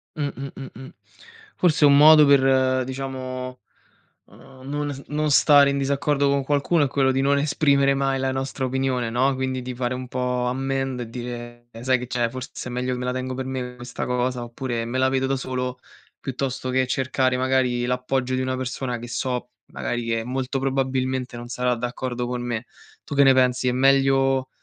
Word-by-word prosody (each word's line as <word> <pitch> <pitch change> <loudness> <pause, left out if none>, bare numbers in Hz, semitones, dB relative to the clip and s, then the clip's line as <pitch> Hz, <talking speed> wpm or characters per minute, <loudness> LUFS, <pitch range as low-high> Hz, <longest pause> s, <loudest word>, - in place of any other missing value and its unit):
Mh, 150 -2 -1
mh, 135 +1 -6
mh, 135 -1 -7
mh. 130 +3 -10 0.7
Forse 165 -4 +3
è - - +8
un 140 - +6
modo 150 +1 +8
per, 140 -2 +5
uhm, 130 -1 +3
diciamo, 130 -1 -5 0.7
uhm, 130 -1 -16
non 145 0 -2
s 135 - -10
non 150 0 -1
stare 145 -1 +6
in 140 - 0
disaccordo 140 +1 +1
con 140 -1 +1
qualcuno, 145 +3 +2
è 140 - +2
quello 135 0 +2
di 135 +1 0
non 140 +1 +3
esprimere 140 -1 +3
mai 135 -1 0
la 130 0 0
nostra 135 0 -3
opinione, 130 -2 -1
no, 130 +4 +2
quindi 130 0 -2
di 125 0 -5
fare 125 0 -2
un 130 0 -5
po' 125 -1 -1
ammend 135 0 -2
e 115 - -6
dire: 120 0 -7
"Sai 130 +1 +2
che 125 - -6
c'è? 120 -1 0
Forse 130 0 -7
è - - -5
meglio 125 +1 -2
che 125 - -4
me 125 - -3
la 125 - -1
tengo 130 0 -3
per 130 0 -4
me 125 -1 -4
questa 125 0 -6
cosa, 125 0 -1
oppure 120 0 -4
me 120 +3 -3
la 130 0 +3
vedo 130 0 0
da 135 0 0
solo, 125 -1 -4 0.4
piuttosto 130 -1 -3
che 130 0 +2
cercare 130 -1 0
magari 130 -2 +1
l'appoggio 125 +1 -1
di 130 - -1
una 130 0 -1
persona, 130 -1 -3
che 120 +1 -8
so 125 0 -3 0.2
magari, 120 0 -3
che 115 -1 -1
molto 130 +2 -2
probabilmente 130 -2 -1
non 120 - -8
sarà 125 0 0
d'accordo 125 +1 -3
con 125 0 -3
me." 120 -1 -3 0.4
Tu 145 - -5
che 140 - +6
ne 135 - +6
pensi? 125 -1 +2
È - - +1
meglio 135 0 +3
130 Hz, 200 wpm, -23 LUFS, 125-135 Hz, 0.7 s, è